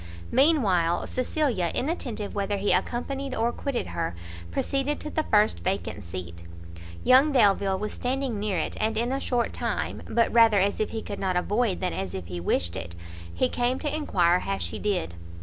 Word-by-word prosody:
Mean 285 +2 +4
while 175 -4 +2
Cecilia, 255 - 0
inattentive 250 - -2
whether 200 0 -1
he 200 +1 +1
accompanied 260 +7 -2
or 230 +1 +1
quitted 275 0 -3
her 85 +1 -3 0.3
proceeded 275 - -1
to 300 - -6
the 315 - +1
first 210 -7 +2
vacant 185 - -3
seat. 85 -1 -7 0.6
Young 265 +4 +6
Delvile 200 -6 +3
was 210 +2 -4
standing 255 -3 -2
near 205 -3 -1
it, 160 - -2
and, 220 0 0
in 240 +2 0
a 270 - 0
short 245 -3 0
time, - - -2
but 230 -1 +1
rather 225 -3 +6
as 200 +2 +1
if 215 - 0
he 225 - -4
could 200 - -6
not 185 -2 0
avoid 205 +2 0
than 180 -1 -1
as 95 -2 -4
if 95 - -5
he 90 0 -5
wished 85 0 0
it, 85 -2 -6 0.4
he 85 +9 +1
came 245 - 0
to 295 +1 -2
enquire 180 - +2
how 100 - -2
she 85 -2 -3
did. 190 - -1
210 Hz, 185 wpm, -26 LUFS, 175-255 Hz, 0.6 s, Young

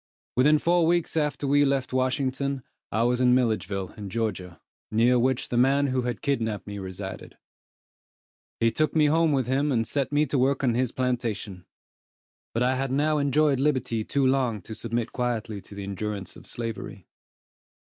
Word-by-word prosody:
Within 150 +5 +5
four 170 +1 +2
weeks 170 -1 +1
after 150 -2 0
we 145 +1 +4
left 135 -2 0
Washington, 130 +1 -1 0.3
I 110 +3 +1
was 125 +1 +2
in 125 0 +5
Milledgeville 100 -6 0
in 105 -3 -7
Georgia, 95 -5 -3 0.3
near 120 +3 +3
which 130 +1 0
the 120 - -1
man 135 +3 +4
who 130 -2 0
had 120 -1 -4
kidnapped 115 -7 -1
me 100 -1 -6
resided. 95 -1 -7 1.2
He 115 0 +3
took 155 +8 0
me 155 -1 +5
home 160 +2 +3
with 135 -3 +1
him, 140 +4 +1
and 115 -3 +1
set 140 +3 -1
me 145 +1 +3
to 140 -1 -1
work 135 +2 +1
on 125 -3 +3
his 125 0 0
plantation; 115 -7 -3 0.8
but 115 - 0
I 130 +1 +2
had 135 0 -2
now 150 +2 +2
enjoyed 140 0 +2
liberty 130 -6 0
too 140 +4 0
long 130 -6 +1
to 110 - -8
submit 115 +1 -3
quietly 115 -4 -2
to 100 - -13
the 100 - -6
endurance 100 -1 -4
of - - -11
slavery. 115 -2 -6
125 Hz, 175 wpm, -26 LUFS, 110-140 Hz, 1.2 s, Within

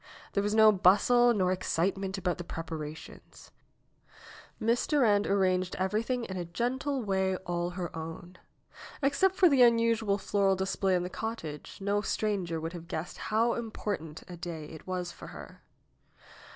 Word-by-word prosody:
There 200 - +2
was 205 +1 0
no 220 -1 +8
bustle 210 +6 +5
nor 185 -5 +2
excitement 190 +2 -1
about 180 -2 -1
the - - -4
preparations. 160 -2 -8 1.1
Miss 230 +1 +1
Durand 220 -9 +3
arranged 185 -2 +1
everything 220 +6 -1
in 190 -4 -5
a 180 - -2
gentle 255 - -2
way 190 -2 +1
all 175 0 -1
her 175 -2 -5
own. 165 +3 -8 0.6
Except 285 +8 +3
for 370 - +6
the 275 -5 +4
unusual 230 -3 +4
floral 195 0 +1
display 190 0 0
in 175 - 0
the 180 - -4
cottage, 165 -11 -6
no 200 +1 0
stranger 195 -7 -1
would 165 +2 -5
have 170 -1 -8
guessed 160 +2 -5
how 225 +2 +2
important 205 -8 -4
a 180 - -8
day 170 -3 -6
it 160 - -11
was 180 -1 -3
for - - -11
her. - - -11
195 Hz, 150 wpm, -30 LUFS, 175-225 Hz, 1.1 s, no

